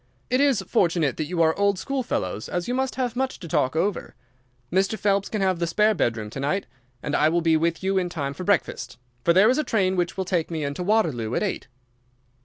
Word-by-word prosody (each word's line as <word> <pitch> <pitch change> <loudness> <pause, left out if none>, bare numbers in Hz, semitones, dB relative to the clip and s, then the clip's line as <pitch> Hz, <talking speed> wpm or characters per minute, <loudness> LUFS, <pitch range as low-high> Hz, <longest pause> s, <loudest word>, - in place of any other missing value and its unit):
It 255 +2 +3
is 275 -9 +3
fortunate 170 -7 +1
that 155 - -1
you 170 0 +1
are 160 0 +3
old 200 -1 +2
schoolfellows, 190 - -3
as 175 -1 -2
you 245 - -1
must 265 0 -1
have 250 -2 -2
much 265 +1 -1
to 170 - -8
talk 150 -4 0
over. 190 +4 -1 0.6
Mr. 195 +4 +1
Phelps 200 -1 +1
can 215 - -2
have 185 -2 +1
the 170 - 0
spare 210 +6 +3
bedroom 110 - -1
to - - -6
night, 150 +9 -1 0.4
and 150 - -1
I 155 - +4
will 170 +1 +1
be 165 -1 +3
with 165 +2 0
you 190 0 +2
in 180 -1 -2
time 140 -5 -3
for 165 - -7
breakfast, 170 -8 -1 0.3
for 170 - +4
there 190 +5 +6
is 260 - +1
a - - +1
train 190 -8 +1
which 175 +1 -1
will 190 - -1
take 175 -3 -1
me 160 -3 -3
into 140 +4 -3
Waterloo 165 - +1
at - - 0
eight." 200 - -3
180 Hz, 230 wpm, -24 LUFS, 160-205 Hz, 0.6 s, there